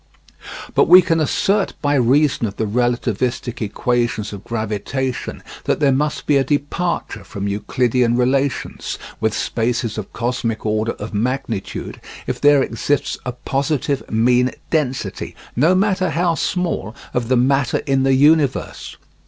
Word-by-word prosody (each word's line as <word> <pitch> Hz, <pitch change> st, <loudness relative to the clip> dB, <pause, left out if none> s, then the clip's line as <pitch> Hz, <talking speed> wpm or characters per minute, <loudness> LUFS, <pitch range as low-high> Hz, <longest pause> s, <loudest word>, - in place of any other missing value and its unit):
But -, -, +4 dB
we 185 Hz, 0 st, +9 dB
can 165 Hz, -1 st, +1 dB
assert 195 Hz, +6 st, +1 dB
by 145 Hz, -1 st, +1 dB
reason 135 Hz, -1 st, +3 dB
of 100 Hz, -, -7 dB
the 110 Hz, -, -1 dB
relativistic 120 Hz, +1 st, -1 dB
equations 120 Hz, 0 st, -1 dB
of 100 Hz, -1 st, -8 dB
gravitation 115 Hz, +4 st, -3 dB, 0.2 s
that -, -, +1 dB
there 145 Hz, -2 st, +4 dB
must 145 Hz, +3 st, -1 dB
be 145 Hz, -, +3 dB
a 135 Hz, -, +3 dB
departure 150 Hz, +5 st, -2 dB
from 100 Hz, -2 st, -5 dB
Euclidean 120 Hz, +4 st, +1 dB
relations, 135 Hz, +2 st, -1 dB, 0.2 s
with 110 Hz, -1 st, 0 dB
spaces 115 Hz, -1 st, -1 dB
of 105 Hz, -, -7 dB
cosmic 115 Hz, -2 st, -2 dB
order 110 Hz, +1 st, 0 dB
of 105 Hz, +2 st, -8 dB
magnitude, 115 Hz, -2 st, -3 dB, 0.2 s
if -, -, -4 dB
there 145 Hz, -2 st, +5 dB
exists 135 Hz, +5 st, -1 dB
a -, -, 0 dB
positive 140 Hz, +2 st, -2 dB
mean 125 Hz, +3 st, +3 dB, 0.2 s
density, 140 Hz, -6 st, -2 dB, 0.2 s
no 160 Hz, +9 st, +4 dB
matter 190 Hz, -2 st, +1 dB
how 170 Hz, +2 st, +1 dB
small, 165 Hz, -, -2 dB, 0.2 s
of 120 Hz, -2 st, -1 dB
the 130 Hz, +1 st, +3 dB
matter 135 Hz, +1 st, +2 dB
in 135 Hz, -1 st, +2 dB
the 135 Hz, 0 st, +3 dB
universe. 145 Hz, 0 st, +2 dB
125 Hz, 140 wpm, -20 LUFS, 115-145 Hz, 0.2 s, we